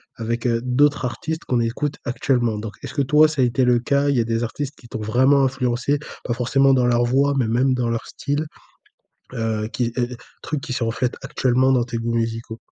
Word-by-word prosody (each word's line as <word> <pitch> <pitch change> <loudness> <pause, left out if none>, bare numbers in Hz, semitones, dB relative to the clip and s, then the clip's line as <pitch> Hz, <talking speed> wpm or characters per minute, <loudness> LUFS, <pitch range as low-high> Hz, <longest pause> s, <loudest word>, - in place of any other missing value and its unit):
avec, 115 +1 -2
heu, 115 -1 +1
d'autres 130 +2 +2
artistes 160 +6 -4
qu'on 125 - +1
écoute 135 +5 -2
actuellement. 120 -2 0
Donc, 105 0 -6
est-ce - - -6
que 140 - 0
toi, 150 +3 +5
ça 155 -3 -1
a - - +5
été 125 +2 +1
le 125 -1 +4
cas? 140 +3 +1
Il 140 - +2
y - - +3
a - - +3
des 115 +1 -1
artistes 140 +4 -4
qui 120 - -16
t'ont 110 - -6
vraiment 130 +6 +3
influencé, 130 +1 0 0.3
pas 120 - -1
forcément 135 +3 +3
dans 125 -2 +3
leur 120 0 +3
voix, 140 +3 +2
mais 125 - +1
même 125 +4 +2
dans 120 -2 -1
leur 115 -1 -2
style? 145 +2 -3 0.9
Heu, 110 -2 -2
qui 120 0 -2
et 125 - +1
et 125 - -6 0.3
trucs 150 -2 -3
qui 150 - -5
se 125 - -2
reflètent 120 +2 -1
actuellement 130 +1 +2
dans 125 -2 +2
tes 120 -1 -4
goûts 115 0 -2
musicaux? 115 0 -3
125 Hz, 225 wpm, -22 LUFS, 115-135 Hz, 0.9 s, toi